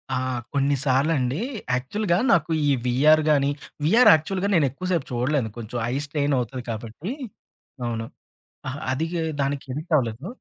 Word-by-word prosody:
ఆ! -, -, 0 dB, 0.4 s
కొన్ని 140 Hz, 0 st, +2 dB
సార్లండి 135 Hz, +1 st, +1 dB, 0.3 s
యాక్చువల్‌గా 170 Hz, +9 st, 0 dB
నాకు 165 Hz, -, +2 dB, 0.2 s
ఈ -, -, +4 dB, 0.2 s
వీఆర్ 150 Hz, +6 st, +5 dB
గాని 140 Hz, -1 st, +3 dB, 0.4 s
వీఆర్ 230 Hz, +10 st, +6 dB
యాక్చువల్‌గా 185 Hz, +5 st, 0 dB
నేనెక్కువ 150 Hz, +3 st, 0 dB
సేపు 170 Hz, -6 st, 0 dB
చూడలేను. 125 Hz, 0 st, 0 dB
కొంచెం 120 Hz, +1 st, -6 dB, 0.2 s
ఐ -, -, -1 dB
స్ట్రెయిన్ 145 Hz, -1 st, 0 dB
అవుతది 125 Hz, +1 st, -4 dB
కాబట్టి 115 Hz, -, -6 dB, 0.7 s
అవును. 115 Hz, -1 st, -3 dB, 0.6 s
అహా! 130 Hz, +2 st, -4 dB
అది 160 Hz, +5 st, -1 dB, 0.3 s
దానికి 140 Hz, +1 st, -2 dB
ఎడిక్టవ్వలేదు. 145 Hz, -4 st, -1 dB
140 Hz, 135 wpm, -24 LUFS, 125-160 Hz, 0.7 s, వీఆర్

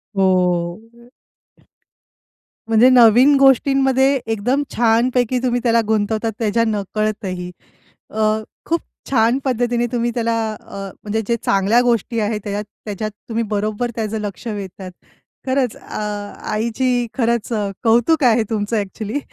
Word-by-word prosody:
हो. 180 Hz, -3 st, +2 dB, 1.9 s
म्हणजे 225 Hz, +3 st, +6 dB
नवीन 250 Hz, +3 st, +6 dB
गोष्टींमध्ये 270 Hz, 0 st, +4 dB
एकदम 225 Hz, +6 st, 0 dB
छानपैकी 240 Hz, +2 st, +2 dB
तुम्ही 245 Hz, -1 st, +1 dB
त्याला 230 Hz, -1 st, +3 dB
गुंतवतात 220 Hz, +1 st, 0 dB
त्याच्या 230 Hz, 0 st, +1 dB
नकळतही. 200 Hz, -3 st, -3 dB, 0.6 s
अ, 220 Hz, -, -6 dB, 0.5 s
खूप 335 Hz, 0 st, 0 dB, 0.3 s
छान 235 Hz, 0 st, +3 dB
पद्धतीने 240 Hz, -1 st, 0 dB
तुम्ही 240 Hz, -1 st, 0 dB
त्याला 230 Hz, -1 st, 0 dB, 0.2 s
अ, -, -, -13 dB, 0.3 s
म्हणजे 215 Hz, +1 st, -1 dB
जे 235 Hz, -, +2 dB
चांगल्या 200 Hz, +5 st, +3 dB
गोष्टी 235 Hz, -1 st, 0 dB
आहेत, 210 Hz, 0 st, -1 dB
त्याच्यात 205 Hz, 0 st, -3 dB, 0.2 s
त्याच्यात 215 Hz, +1 st, -4 dB, 0.2 s
तुम्ही 230 Hz, +1 st, -1 dB
बरोबर 215 Hz, +4 st, -1 dB
त्याचं 220 Hz, -1 st, -2 dB
लक्ष 205 Hz, +3 st, -6 dB
वेधतात. 195 Hz, -3 st, -6 dB, 0.6 s
खरंच 260 Hz, -3 st, 0 dB
अ, -, -, -7 dB, 0.5 s
आईची 240 Hz, +2 st, 0 dB
खरंच 235 Hz, -2 st, 0 dB
अ, 205 Hz, -2 st, -1 dB
कौतुक 240 Hz, +7 st, +3 dB
आहे 230 Hz, -2 st, +4 dB
तुमचं 215 Hz, 0 st, -1 dB
अ‍ॅक्चुअली 210 Hz, +5 st, -3 dB
225 Hz, 120 wpm, -19 LUFS, 210-245 Hz, 1.9 s, म्हणजे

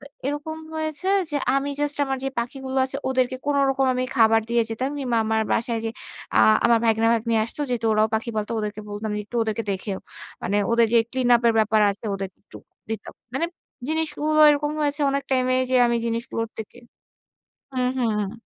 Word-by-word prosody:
তো -, -, -13 dB, 0.2 s
এরকম 295 Hz, +2 st, -3 dB, 0.2 s
হয়েছে 315 Hz, +3 st, -3 dB, 0.2 s
যে, 295 Hz, -, -1 dB, 0.2 s
আমি 280 Hz, +1 st, -1 dB
জাস্ট 290 Hz, 0 st, -1 dB
আমার 270 Hz, -1 st, -2 dB
যে -, -, +1 dB
পাখিগুলো 265 Hz, +2 st, -4 dB
আছে 270 Hz, +1 st, -5 dB
ওদেরকে 260 Hz, -1 st, +1 dB
কোনোরকম 275 Hz, -2 st, +2 dB
আমি 255 Hz, 0 st, 0 dB
খাবার 225 Hz, -1 st, +5 dB
দিয়ে 235 Hz, 0 st, +3 dB
যেতাম 255 Hz, +5 st, -2 dB
কিংবা 250 Hz, -4 st, -1 dB
আমার 220 Hz, 0 st, +1 dB
বাসায় 230 Hz, -1 st, 0 dB
যে, 225 Hz, -, -1 dB, 0.5 s
আ -, -, +7 dB, 0.3 s
আমার 235 Hz, -1 st, +5 dB
ভাইগনা 225 Hz, 0 st, +3 dB
ভাইগনি 230 Hz, 0 st, 0 dB
আসতো। 230 Hz, +6 st, -8 dB
যেহেতু 230 Hz, -2 st, -1 dB
ওরাও 215 Hz, +1 st, +3 dB
পাখি 225 Hz, +2 st, -1 dB
পালতো। 215 Hz, +1 st, -2 dB
ওদেরকে 210 Hz, 0 st, -4 dB
বলতাম 210 Hz, +1 st, -4 dB
যে 210 Hz, -, -2 dB
একটু 240 Hz, -, -6 dB
ওদেরকে 220 Hz, 0 st, -2 dB
দেখেও। 190 Hz, 0 st, -4 dB, 0.4 s
মানে 200 Hz, +3 st, 0 dB, 0.2 s
ওদের 230 Hz, 0 st, +5 dB
যে 235 Hz, -, +6 dB
ক্লিন 255 Hz, -1 st, 0 dB
আপ 235 Hz, -, -7 dB
এর 225 Hz, -, +2 dB
ব্যাপার 220 Hz, 0 st, +3 dB
আছে 205 Hz, +3 st, -7 dB
ওদেরকে 195 Hz, -1 st, -6 dB
একটু -, -, -12 dB, 0.3 s
দিতাম। 220 Hz, -2 st, -5 dB, 0.2 s
মানে 330 Hz, +5 st, +1 dB, 0.4 s
জিনিসগুলো 310 Hz, -1 st, 0 dB
এরকম 295 Hz, 0 st, 0 dB
হয়েছে 290 Hz, 0 st, 0 dB
অনেক 280 Hz, 0 st, -1 dB
টাইম 255 Hz, -1 st, +2 dB
এ -, -, +3 dB
যে 255 Hz, -, +3 dB
আমি 235 Hz, 0 st, +1 dB
জিনিসগুলোর 230 Hz, -1 st, -3 dB
থেকে 220 Hz, +2 st, -8 dB, 1.0 s
হুম, 250 Hz, -1 st, +1 dB
হুম। 220 Hz, -2 st, -1 dB
235 Hz, 190 wpm, -24 LUFS, 220-275 Hz, 1.0 s, আ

